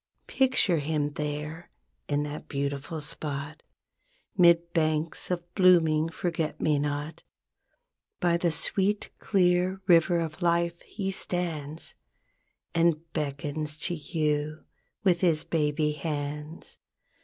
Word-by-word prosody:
Picture 255 - +2
him 150 0 -1
there 150 +3 -4 0.4
in 145 0 0
that 150 0 -6
beautiful 140 +3 -3
spot 150 -1 -1 0.7
'Mid 170 -2 +4
banks 155 -1 +1
of 175 -1 -4
blooming 165 -4 +4
forget 165 -2 -3
me 150 -2 +2
not. 145 +2 -3 1.0
By 170 -1 +2
the 170 -1 +1
sweet, 195 +5 +2
clear 185 -1 +2
river 175 -1 +4
of 165 +1 -4
life 170 0 +1
he 195 -2 -4
stands, 165 -5 -2 0.8
And 165 -1 +1
beckons 150 0 -2
to 175 +3 -1
you 155 -1 -2 0.4
with 180 -4 +3
his 165 -4 +2
baby 150 -1 0
hands. 150 +1 -5
160 Hz, 110 wpm, -27 LUFS, 150-175 Hz, 1.0 s, Mid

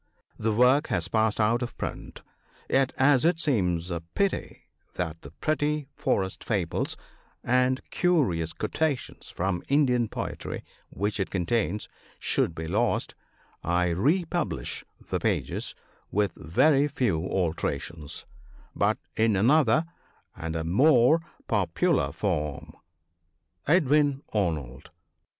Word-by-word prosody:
The 110 +1 +1
work 125 +6 +4
has - - -1
passed 110 -1 +1
out 115 +3 +3
of 120 - -5
print; - - -6 0.4
yet, 135 -1 +2
as 135 -1 +5
it 165 0 +3
seems 90 - 0
a 85 -1 -2
pity 200 -1 -1 0.3
that 85 -2 -3
the 70 - -10
pretty 150 - -1
forest 95 -1 -1
fables 95 -7 -1 0.5
and 125 +1 +1
curious 120 - +2
quotations 140 +4 -2
from 90 -1 -2
Indian 125 -5 +3
poetry - - -5 0.3
which 105 +2 -2
it 95 - -1
contains 100 +1 -1 0.3
should 80 - 0
be 80 0 -5
lost, 105 +8 0 0.5
I 90 +1 +1
republish 150 - 0 0.3
the - - +1
pages, - - -1 0.4
with 105 -2 +1
very 140 - +3
few 115 - 0
alterations, 80 -3 -2 0.5
but - - +2 0.2
in 110 -1 +3
another 140 - +4 0.5
and 80 0 -5
a 80 - -1
more 130 - +5 0.3
popular - - +1
form. 75 -1 -2 0.9
Edwin 145 -3 +3
Arnold. 75 - -2
110 Hz, 115 wpm, -27 LUFS, 85-140 Hz, 0.9 s, as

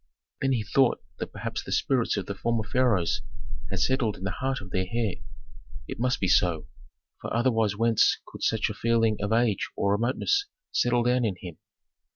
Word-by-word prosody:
Then 135 0 +2
he 115 -4 0
thought 125 +5 +3 0.2
that - - -4
perhaps - - -4
the - - -8
spirits 125 -5 +1
of 100 - -2
the 100 - -4
former 115 +2 -1
pharaohs 105 -6 +1 0.5
had - - -2
settled 130 -5 +1
in - - -10
the 95 - -1
heart 135 +6 -2
of 95 -2 -11
their 95 0 -1
heir. 115 -4 -1 0.7
It - - -6
must 125 0 +1
be 95 - +1
so, 85 -4 +2 0.5
for - - -5
otherwise 110 -4 +1
whence 115 0 +3
could - - -12
such 110 -1 +1
a - - -4
feeling 115 0 +2
of 105 +1 -2
age 115 -3 +2
or 100 - +1
remoteness 130 - +1 0.2
settle 120 0 +2
down 125 +1 +2
in 105 -5 0
him? 85 -4 -9
115 Hz, 190 wpm, -27 LUFS, 100-120 Hz, 0.7 s, thought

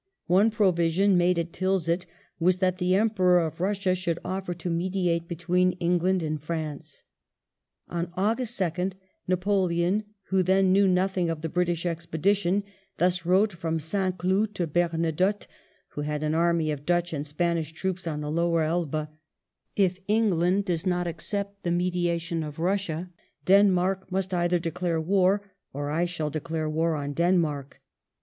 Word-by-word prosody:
One 195 +6 +4
provision 190 -2 +2
made 175 0 +3
at 170 0 -2
Tilsit 185 -2 0 0.3
was 180 +2 +3
th'at 185 -1 +1
the 180 0 +2
Emperor 190 -4 +3
of 165 -3 -1
Bussia 190 0 +1
should 175 -2 -2
offer 185 -1 -3
to 175 +1 -5
mediate 170 -1 0
between 180 +2 +1
England 180 +1 +1
and 155 -2 -3
France. 155 -2 -5 0.8
On 175 0 -3
August 225 +4 0
2nd 180 +1 -1 0.3
Napoleon, 185 0 +1 0.3
who 190 -1 +3
then 190 +1 +3
knew 195 +1 +5
nothing 185 -1 +1
of 165 -2 -3
the 165 - -2
British 175 0 0
expedition, 175 +4 0 0.3
thus 180 -1 +1
wrote 195 +4 +3
from 165 -2 -2
St. 185 +4 -1
Cloud 195 +4 0
to 175 - 0
Bemadotte, 170 +4 0 0.4
who 145 - -6
had 150 0 -2
an 155 0 0
army 165 -1 +2
of 145 -1 -5
Dutch 175 +1 0
and 150 0 -3
Spanish 165 +1 -1
troops 185 +2 -4
on 150 -2 -3
the 150 0 -3
Lower 170 0 +1
Elbe, 155 -2 -1 0.3
— - - -60
" - - -51
If 180 +1 -7
England 200 -3 +2
does 170 -4 -1
not 180 -2 0
accept 200 +4 -4
the 175 - -2
mediation 175 -1 0
of 150 -2 -6
Eussia, 180 0 -1 0.4
Den 200 +2 +6
mark 185 +1 0
must 190 0 -1
either 175 0 +2
declare 170 0 -2
war 190 +4 +2 0.3
or 145 +1 -3
I 165 +3 +1
shall 160 -4 -3
declare 160 +1 -3
war 160 +1 0
on 145 -1 -3
Denmark. 160 -5 0
175 Hz, 160 wpm, -26 LUFS, 165-185 Hz, 0.8 s, Den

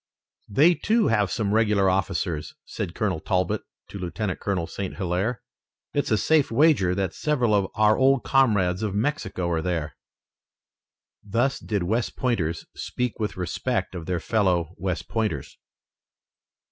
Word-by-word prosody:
"They, 150 - +5
too, 220 +4 +2
have 105 -3 +2
some 105 -4 -1
regular 105 -3 +3
officers," 95 -4 -1
said 85 - -5
Colonel 95 -7 0
Talbot 90 +2 0 0.3
to 100 - -7
Lieutenant 95 +2 -3
Colonel 95 -5 -1
St. 95 +2 -5
Hilaire. 100 +6 -1 0.5
"It's 145 - 0
a 110 - +3
safe 155 +4 +3
wager 115 - +3
that 95 -3 -1
several 125 -8 +1
of 100 -2 +2
our 105 0 +4
old 135 +1 +3
comrades 105 -9 +2
of 105 -3 -2
Mexico 105 - -1
are 80 -1 0
there." 80 -6 -2 1.3
Thus 120 +7 0
did 100 -4 -2
West 110 +6 -1
Pointers 85 -11 -1
speak 125 -2 -3
with 105 -4 -2
respect 95 +4 -2
of 85 -3 -7
their 90 -2 0
fellow 90 -6 +1
West 90 -1 -3
Pointers. 105 - -3
100 Hz, 145 wpm, -25 LUFS, 90-120 Hz, 1.3 s, They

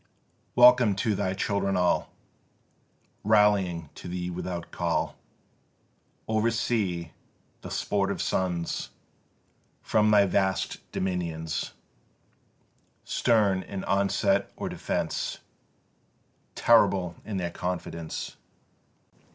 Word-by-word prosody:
Welcome 125 -4 +7
to 105 +3 0
thy 95 -1 -1
children 100 -1 0
all 90 -1 +2 1.1
Rallying 100 -7 +3
to - - -10
thee 90 0 -3
without 90 -1 -5
call - - -1 1.1
Oversea, 110 -6 0 0.5
the - - -8
sportive 100 -1 -1
sons 90 -2 -1 0.9
From 105 0 +3
thy 105 -1 +6
vast 95 0 0
dominions! 85 -4 -3 1.3
Stern 105 -5 +2
in 95 0 -6
onset 100 0 +1
or - - -4
defence, - - -2 1.2
Terrible 90 -3 +4
in 105 -3 -4
their 85 -2 -2
confidence. 85 -2 -5
95 Hz, 85 wpm, -27 LUFS, 90-105 Hz, 1.3 s, Welcome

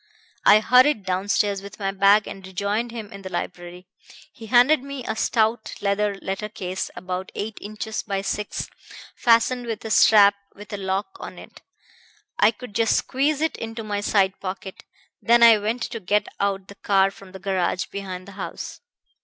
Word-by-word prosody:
I 210 +1 +8
hurried 250 -2 +4
downstairs 195 +1 0
with 200 0 -11
my 195 -2 -2
bag 200 +2 +4
and 195 - -8
rejoined 200 +5 -2
him 225 -4 -8
in 195 - -9
the 190 - -7
library. 180 0 -6 0.5
He 225 - -11
handed 250 +5 +5
me 275 -2 -7
a 220 - -2
stout 220 0 0
leather 200 0 0
letter 195 +2 -3
case, 185 -2 -4
about 185 +1 -5
eight 210 +1 -5
inches 215 +1 -5
by 195 -2 -3
six, 210 +1 -3 0.5
fastened 240 +1 +3
with 225 -1 -5
a 220 - -4
strap 205 -2 +7 0.2
with 205 +1 -11
a - - -2
lock 195 - -3
on - - -8
it. - - -13 0.8
I 210 - +6
could 230 0 -8
just 225 +2 +2
squeeze 285 +3 0
it 320 - 0
into 225 0 -6
my 205 -1 -3
side 195 -2 +2
pocket. 190 0 -7 0.4
Then 235 0 +5
I 230 -2 +8
went 225 +3 -2
to 230 - -5
get 210 +2 +1
out 195 -1 -1
the - - -11
car 195 -1 +2
from 195 -1 -15
the 190 - -9
garage 190 -1 -1
behind 185 -2 -7
the - - -10
house. - - -7
205 Hz, 180 wpm, -23 LUFS, 195-225 Hz, 0.8 s, I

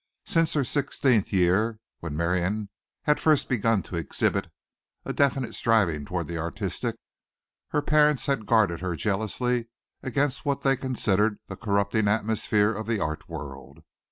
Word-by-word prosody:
Since 165 -1 +2
her 145 - +2
sixteenth 130 -5 +1
year, 95 +5 +2 0.2
when 75 -3 -5
Miriam 90 +5 0 0.3
had 150 - +2
first 155 -3 +3
begun 115 -3 +1
to 90 - -6
exhibit 80 -5 0 0.6
a - - -3
definite 135 -4 +1
striving 90 -11 +2
toward 90 0 -3
the 85 0 -4
artistic, 85 +1 -3 0.7
her 150 - -1
parents 150 -2 +3
had 135 -6 -1
guarded 105 -8 +3
her 90 -2 -2
jealously 110 - -1 0.3
against 140 +1 -1
what 140 -1 -1
they 135 -1 +3
considered 110 -5 0
the - - -5
corrupting 100 0 0
atmosphere 105 0 +1
of 110 +1 -5
the 115 -2 0
art 75 -1 -3
world. 70 0 -9
110 Hz, 145 wpm, -26 LUFS, 90-130 Hz, 0.7 s, first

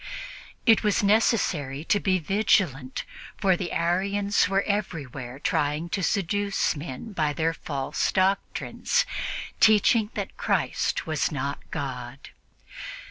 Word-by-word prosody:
It 225 -3 +6
was 210 -1 +1
necessary 185 - +2
to 205 - +2
be 190 -2 +2
vigilant, 165 - +1 0.3
for 190 -3 +3
the 175 0 -4
Arians 200 +5 +1
were 195 0 +2
everywhere 140 - -3
trying 150 +3 0
to 195 - -1
seduce 200 +1 0
men 145 - -7
by 155 -5 0
their 160 +2 0
false 140 -4 -2
doctrines, 195 - +1 0.5
teaching 215 0 +5
that - - -4
Christ - - 0
was 155 -2 0
not 140 0 -3
God. 130 -3 -6
175 Hz, 115 wpm, -26 LUFS, 145-205 Hz, 0.5 s, It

